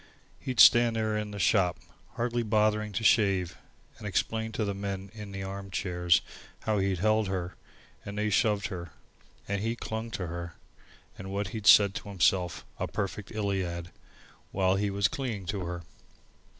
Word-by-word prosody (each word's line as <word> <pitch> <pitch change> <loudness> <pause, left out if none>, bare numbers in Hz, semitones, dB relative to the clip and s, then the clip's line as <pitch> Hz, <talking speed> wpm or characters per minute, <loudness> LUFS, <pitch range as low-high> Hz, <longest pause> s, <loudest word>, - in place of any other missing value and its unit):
He'd 130 -4 -4
stand 120 -1 +7
there 110 -1 0
in 105 0 -2
the 105 - -7
shop, 95 -3 +2 0.4
hardly 120 0 -1
bothering 105 -1 +1
to 110 - -2
shave, 95 -6 +3 0.4
and 105 - -6
explain 110 +3 -1
to 110 - -1
the 100 - -1
men 100 -1 -5
in 105 -2 -8
the 95 0 -5
arm 100 0 -6
chairs 90 -2 +1 0.4
how 105 -2 0
he 95 0 +1
held 110 +3 +2
her, 95 -2 -3 0.5
and 100 0 -7
they 105 0 0
shoved 105 -1 +2
her, 85 -4 -7 0.5
and 100 0 -1
he 115 +2 -1
clung 110 0 -5
to 100 -4 -4
her, 85 0 -6 0.6
and 95 - -7
what 100 -1 -2
he'd 110 0 -4
said 100 -2 +8
to 100 - -6
himself 90 -3 +1
a - - -1
perfect 100 0 -4
Iliad 95 -5 -2 0.6
while 95 -1 +2
he 100 +1 0
was 100 +1 +2
clinging 125 -9 -4
to 95 0 -3
her. 85 0 -5
100 Hz, 170 wpm, -29 LUFS, 95-110 Hz, 0.6 s, said